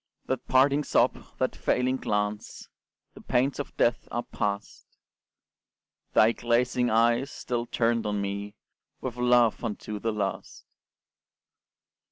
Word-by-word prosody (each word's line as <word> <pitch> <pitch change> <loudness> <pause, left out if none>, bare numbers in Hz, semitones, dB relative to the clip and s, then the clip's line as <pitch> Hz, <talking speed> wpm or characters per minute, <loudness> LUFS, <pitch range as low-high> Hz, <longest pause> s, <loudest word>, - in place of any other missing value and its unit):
That 130 -1 -3
parting 140 +3 +4
sob, - - +2
that - - -1
failing 130 +1 +1
glance 105 -2 -3 0.4
The - - -13
pains 135 +4 0
of 145 - -6
death 120 0 +1
are 120 - -2
past! 100 +1 -4 1.3
Thy 110 +1 +6
glazing 120 +1 +1
eyes 115 +4 +3
still 120 -3 -4
turned 115 -2 0
on 105 0 -1
me 100 +1 -4 0.4
With 125 -2 -5
love 120 -2 +3
unto 105 -1 -4
the 115 +2 -1
last! 105 -2 -4
120 Hz, 120 wpm, -27 LUFS, 105-125 Hz, 1.3 s, Thy